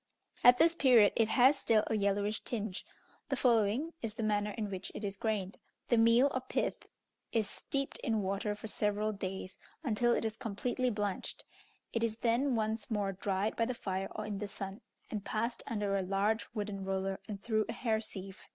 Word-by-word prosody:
At 245 0 +9
this 330 +3 +6
period 245 - +6
it 225 - +3
has 260 +5 +5
still 215 -2 +3
a - - -2
yellowish 205 0 0
tinge. 215 -5 -4 0.4
The 275 - +1
following 245 +5 +2
is 220 -2 -4
the 225 - -3
manner 210 -1 +1
in 210 -1 -4
which 190 0 -5
it - - -5
is 200 -1 -2
grained: 200 -2 -2 0.3
The 235 - +4
meal 230 +5 +5
or 260 - -1
pith 255 - -2 0.4
is 220 -3 +1
steeped 275 +6 -3
in 220 -5 0
water 200 +2 -1
for 210 - -10
several 210 0 0
days, 190 -1 -5 0.2
until 240 -2 +2
it - - 0
is 220 0 -2
completely 250 +2 -1
blanched; 205 -3 -3 0.5
it 230 - 0
is 225 -2 +1
then 240 +3 +1
once 220 -1 -1
more 205 -3 0
dried 195 +2 -1
by 230 - +2
the 250 +1 -2
fire 190 -3 -3
or 215 - -3
in 205 -2 -4
the 205 - -3
sun, 195 0 -6 0.3
and 210 -2 -3
passed 230 +4 -1
under 205 -3 -1
a 195 - +1
large 200 +4 0
wooden 205 -2 -3
roller, 190 0 -2
and 200 -2 -6
through 215 -2 +1
a - - -1
hair 220 -3 0
sieve. 195 -3 -7
215 Hz, 195 wpm, -33 LUFS, 200-230 Hz, 0.5 s, At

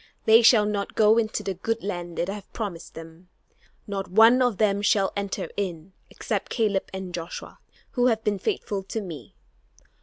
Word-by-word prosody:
They 225 +1 +7
shall 225 -2 +6
not 205 -1 -3
go 220 +1 +5
into 220 -1 -2
the 195 - -2
good 225 +5 -3
land 175 -4 -5
that 175 - 0
I 195 - -3
have 205 -1 -10
promised 185 -7 -6
them. 165 +2 -12 0.6
Not 195 -2 -4
one 225 +6 +6
of 245 -5 +2
them 200 -2 +2
shall 200 -1 +2
enter 200 -1 -3
in, 185 -2 -4 0.2
except - - -3
Caleb 210 -5 0
and 190 -2 -6
Joshua, 170 -1 -7 0.3
who 245 -1 +2
have 225 -2 +1
been 205 -2 0
faithful 195 +1 -2
to 195 +4 -5
me. 175 -8 -9
200 Hz, 180 wpm, -25 LUFS, 185-220 Hz, 0.6 s, They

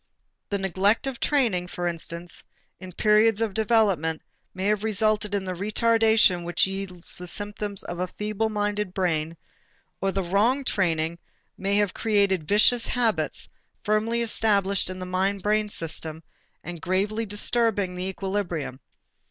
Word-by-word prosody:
The 200 - 0
neglect 195 +4 +1
of 270 -3 -4
training, 230 -12 +1
for 175 0 -5
instance, 170 0 -4 0.4
in 185 0 -9
periods 215 +3 +3
of 225 -3 -1
development 200 -8 +1 0.3
may 185 +1 -4
have 210 0 +1
resulted 215 -1 +1
in 195 -1 -2
the 185 - -3
retardation 220 -1 +3
which 175 0 +2
yields 190 -3 -6
the 180 - -7
symptoms 205 +1 -1
of 175 - -6
a 180 - -1
feeble 215 +3 -2
minded 210 -2 -2
brain, 165 -3 -1 0.6
or 195 0 +1
the 195 0 -1
wrong 215 +10 +2
training 170 -7 0 0.4
may 195 +1 0
have 205 -2 +2
created 200 -7 +1
vicious 220 +3 +4
habits, 235 -3 0 0.4
firmly 225 +2 +1
established 200 -4 +1
in 185 - -5
the 185 - -5
mind 190 +2 -1
brain 210 0 +1
system 160 -3 -2 0.4
and 175 -2 -7
gravely 205 +5 -1
disturbing 205 -2 +1
the 180 +1 -3
equilibrium. 190 -8 -3
200 Hz, 145 wpm, -25 LUFS, 180-215 Hz, 0.6 s, vicious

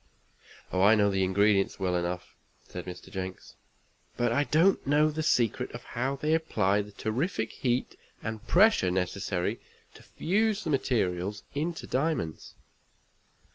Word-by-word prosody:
"Oh, 95 - +1
I 105 +3 +7
know 100 -1 +3
the 95 -1 +1
ingredients 100 +1 +2
well 90 -2 0
enough," 90 +1 -3 0.3
said 90 - -7
Mr. 90 -1 -9
Jenks, 95 -2 -6 0.6
"but 120 -1 +1
I 140 +4 +2
don't 165 +2 +3
know 150 +2 +4
the 155 +1 -3
secret 120 -8 +1
of 120 - -8
how 130 +3 -2
they 150 +3 0
apply 105 -11 +1
the 105 0 -10
terrific 110 - -2
heat 125 0 -1 0.3
and 110 +1 -5
pressure 195 - +5
necessary 90 0 -2 0.3
to - - -15
fuse 215 +4 0
the 160 - -2
materials 100 -7 0
into 160 +4 -3
diamonds." 135 - -2
110 Hz, 140 wpm, -28 LUFS, 95-150 Hz, 0.6 s, I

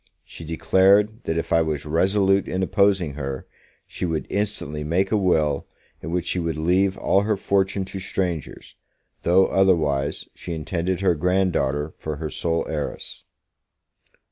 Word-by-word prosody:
She - - -10
declared, 100 +7 +3
that 80 - -1
if 85 - -2
I 85 - +5
was 80 -2 -2
resolute 95 +5 +2
in 95 +1 -1
opposing 95 -5 +2
her, 70 -2 -5 0.4
she - - -7
would 80 -3 -1
instantly 100 -8 -2
make 90 +5 0
a - - +3
will, 80 -8 +1 0.3
in 80 - -6
which 90 +1 -1
she 90 - -1
would 85 -2 -2
leave 95 +4 +2
all 95 - +2
her 105 0 0
fortune 95 0 0
to 95 +1 -7
strangers, 90 -5 -4 0.5
though, 95 +3 +4
otherwise, 80 -8 +1
she 85 - -7
intended 85 +3 -2
her 95 -3 +3
grand 90 +3 +1
daughter 75 +3 -1
for 80 -1 -4
her 75 +1 -5
sole 85 -1 -1
heiress. 75 -2 -5
90 Hz, 155 wpm, -23 LUFS, 80-95 Hz, 0.5 s, I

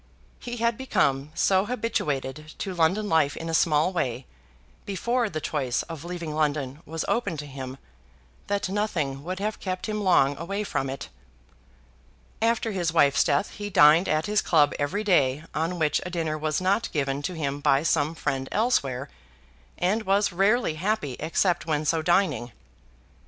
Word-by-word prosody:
He 240 0 -6
had 235 +1 0
become 140 - +1
so 190 0 +3
habituated 155 - -2
to 195 - -4
London 180 +5 +1
life 160 -5 +2
in 165 - -5
a - - -3
small 160 +2 +3
way, 130 -7 -2 0.6
before 235 +4 -1
the 155 - -3
choice 140 -5 -1
of 165 -3 -8
leaving 170 -3 -5
London 150 -2 -1
was 160 +1 -3
open 200 -9 -1
to 150 - -5
him, 130 -2 -7 0.7
that 200 -1 -1
nothing 170 -9 -2
would 185 +3 -4
have 210 +2 -3
kept 185 -1 -4
him 210 -1 -2
long 145 -8 +4
away 195 +5 -3
from 135 -9 -2
it. 135 - -6 1.3
After 230 0 +1
his 175 -5 -1
wife's 145 -4 +4
death 145 +8 +1
he 205 0 -6
dined 160 0 +6
at 155 +1 +1
his 210 0 +2
club 150 -4 +3
every 170 +9 -1
day 150 -8 +2
on 165 +3 -1
which 155 -3 +1
a 180 - -5
dinner 165 -3 -2
was 155 0 -1
not 200 +5 +1
given 140 -1 -1
to 180 +4 -4
him 145 -3 -2
by 140 0 +3
some 155 -1 +1
friend 135 -3 -2
elsewhere, 140 - 0 0.7
and 195 +5 +1
was 200 -1 +1
rarely 200 +1 +2
happy 190 - -1
except 170 +2 0
when 155 -1 0
so 160 +1 +1
dining. 155 - +1
165 Hz, 165 wpm, -26 LUFS, 145-200 Hz, 1.3 s, dined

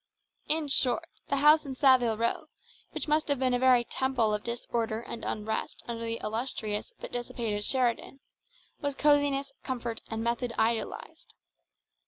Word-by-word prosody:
In 310 -1 +1
short, 275 +3 +3 0.2
the 280 - +2
house 300 +3 +6
in 270 -3 -6
Saville 255 -4 +4
Row, 230 +1 -1 0.4
which - - -4
must 305 +1 +2
have 285 -1 +1
been 255 -1 +1
a 245 - +2
very 255 -1 +5
temple 245 -4 0
of 210 - -2
disorder 230 -1 -2
and 235 -1 -7
unrest 215 +1 -3
under 230 -1 -4
the 230 0 -3
illustrious 220 - -3
but - - -8
dissipated 230 -3 -3
Sheridan, 255 +2 0 0.6
was 285 -1 -2
cosiness, 285 -2 +2
comfort, 240 -3 -4
and 225 0 -3
method 235 +1 -1
idealised. 220 - -2
245 Hz, 150 wpm, -29 LUFS, 230-275 Hz, 0.6 s, house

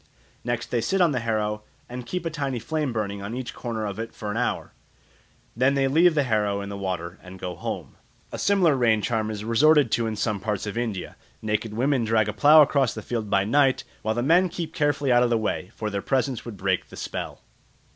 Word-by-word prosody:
Next 120 0 -3
they 120 - +1
sit 190 +12 0
on 175 -3 +4
the 130 - 0
harrow 105 -2 -1 0.3
and 125 0 -7
keep 180 +2 -3
a 165 - -1
tiny 140 -5 -2
flame 150 +3 -2
burning 100 -3 -3
on 100 +4 -5
each 130 -1 -5
corner 115 -3 -4
of 100 0 -5
it 115 0 -6
for 105 -1 -4
an - - -4
hour. 125 - -2 0.8
Then 130 +4 +3
they 135 -1 +2
leave 165 +4 +4
the 145 - +3
harrow 105 -4 0
in 100 0 -5
the 100 - -5
water 90 -2 -4
and 90 0 -11
go 90 -1 -5
home. - - -6 0.3
A - - -5
similar 185 -7 +3
rain 115 -5 +2
charm 110 -3 0
is 105 -1 -5
resorted 145 +3 +4
to 115 0 +1
in 110 - -3
some 105 -1 -1
parts 105 +1 -2
of 105 - -5
India; 115 -6 -3 0.3
naked 105 0 -2
women 130 +1 +1
drag 110 -1 +2
a 105 - -2
plough 150 +1 +7
across 135 -4 +1
a 110 - -5
field 110 -2 -3
by 100 -1 +3
night, 135 +2 +3 0.2
while 110 +1 -1
the 120 - 0
men 175 +6 +4
keep 165 -1 -5
carefully 145 -4 +1
out 120 0 +5
of 125 - +3
the 115 - +2
way, 105 -4 -2
for 110 -1 -3
their 100 0 -2
presence 130 +2 -1
would 115 -4 -7
break 95 -1 -1
the - - -11
spell. - - -5
115 Hz, 230 wpm, -25 LUFS, 105-135 Hz, 0.8 s, plough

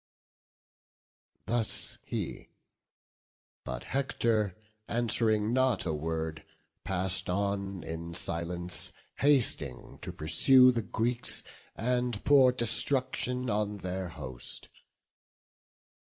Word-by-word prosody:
Thus 115 -2 0
he; - - -5 1.1
but 65 0 -5
Hector, 115 -7 0 0.3
answ'ring 115 -2 +1
not 130 -5 +2
a 80 - -1
word, 80 +1 -3 0.4
Pass'd 95 0 -1
on 100 -1 -2
in 85 +1 -6
silence, 85 +1 -1 0.2
hasting 135 - +1
to - - -5
pursue 125 - +6
The 120 -2 -1
Greeks, 120 +3 -1 0.3
and 125 -1 -1
pour 135 -3 +6
destruction 125 +1 +1
on 105 -1 -1
their 95 -1 -4
host. 65 -6 -4
105 Hz, 85 wpm, -30 LUFS, 90-125 Hz, 1.1 s, pursue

